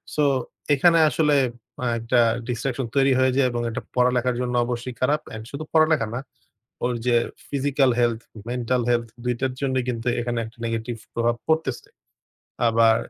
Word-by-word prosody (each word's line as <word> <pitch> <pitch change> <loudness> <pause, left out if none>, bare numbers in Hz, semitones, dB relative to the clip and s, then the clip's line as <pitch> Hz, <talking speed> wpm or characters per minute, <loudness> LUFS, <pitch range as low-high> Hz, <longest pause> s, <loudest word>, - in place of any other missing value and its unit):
So, 150 - +2 0.5
এখানে 165 +4 +5
আসলে 150 +2 +2 0.5
আ - - 0
একটা 115 +2 +2 0.3
ডিসট্রাকশন 125 +1 -2
তৈরি 135 0 +4
হয়ে 130 0 +4
যায় 135 - +4
এবং 120 0 -2
এটা 115 - -4
পড়ালেখার 125 0 +2
জন্য 125 -1 -2
অবশ্যই 120 +1 -4
খারাপ। 145 +4 +2
অ্যান্ড 110 0 -7
শুধু 145 +2 -5
পড়ালেখা 155 -6 +4
না, 120 - -2 0.7
ওর 125 - +1
যে 120 - +3 0.3
ফিজিক্যাল 140 -1 +2
হেলথ, 120 -2 +1 0.3
মেন্টাল 125 0 0
হেলথ 120 -1 +1 0.2
দুইটার 125 +2 -1
জন্যই 130 -2 0
কিন্তু 120 0 -2
এখানে 120 0 -2
একটা 110 +1 -12
নেগেটিভ 115 +1 -3 0.2
প্রভাব 120 0 +1
পড়তেছে। 160 -5 0 0.8
আবার 115 0 +5
125 Hz, 155 wpm, -24 LUFS, 120-135 Hz, 0.8 s, এখানে